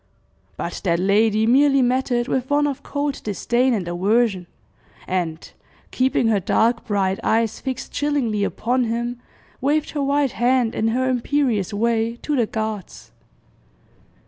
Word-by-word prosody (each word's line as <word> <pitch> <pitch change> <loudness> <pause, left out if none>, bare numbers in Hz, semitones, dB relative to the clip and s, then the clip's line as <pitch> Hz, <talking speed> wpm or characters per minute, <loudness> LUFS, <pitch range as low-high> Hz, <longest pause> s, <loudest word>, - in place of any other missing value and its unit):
But - - -5
that 170 -3 +2
lady 210 +4 +2
merely 275 +3 +4
met 255 +2 +1
it 240 0 0
with 260 0 -1
one 290 0 +3
of 285 -1 -3
cold 285 -1 -3
disdain 240 +5 +1
and 185 -5 -3
aversion, 190 +1 +1 0.6
and, 170 -3 -3 0.4
keeping 255 -2 +1
her 210 -3 +2
dark 230 +5 +1
bright 195 -2 0
eyes 225 -1 +1
fixed 260 -2 -5
chillingly 265 -8 0
upon 245 +5 0
him, 235 +1 -3 0.4
waved 295 +3 +1
her 295 - -2
white 280 -1 +1
hand, 245 -1 +1
in 220 - 0
her 255 +3 0
imperious 250 -5 0
way, 230 +2 0
to 300 - -1
the 240 -5 +1
guards. 215 -3 -5
235 Hz, 145 wpm, -21 LUFS, 210-260 Hz, 0.6 s, merely